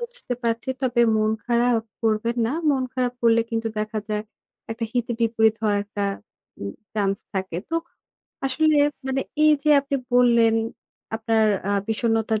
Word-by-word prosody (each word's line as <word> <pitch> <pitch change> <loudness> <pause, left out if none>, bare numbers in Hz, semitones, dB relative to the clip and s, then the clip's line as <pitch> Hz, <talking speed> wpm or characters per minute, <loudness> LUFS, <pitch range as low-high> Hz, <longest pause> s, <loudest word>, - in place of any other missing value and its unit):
বুঝতে 475 - -5
পারছি। 230 +2 -1
তবে 245 -2 +2 0.2
মন 215 0 +2
খারাপ 235 -1 +2 0.2
করবেন 225 +2 +1
না। - - -1 0.2
মন 265 -2 +1
খারাপ 250 -1 0
করলে 230 0 +5
কিন্তু 225 0 -1
দেখা 215 0 -2
যায় 210 0 -1 0.5
একটা 225 +1 -3
হিতে 245 -1 -1
বিপরীত 225 -1 +3
হওয়ার 205 -1 +2
একটা 205 0 -5 0.6
উম 100 0 -4 0.2
চান্স 200 -2 +1 0.2
থাকে। 190 -3 -3
তো 330 - -3 0.7
আসলে 300 +4 +1 0.4
মানে 265 0 0 0.2
এই 305 - +7
যে 300 - +3
আপনি 275 0 -2 0.2
বললেন, 235 -2 +5 0.6
আপনার 225 0 +2 0.3
আ - - +2 0.2
বিষন্নতার 225 -1 +1
230 Hz, 150 wpm, -23 LUFS, 220-245 Hz, 0.7 s, এই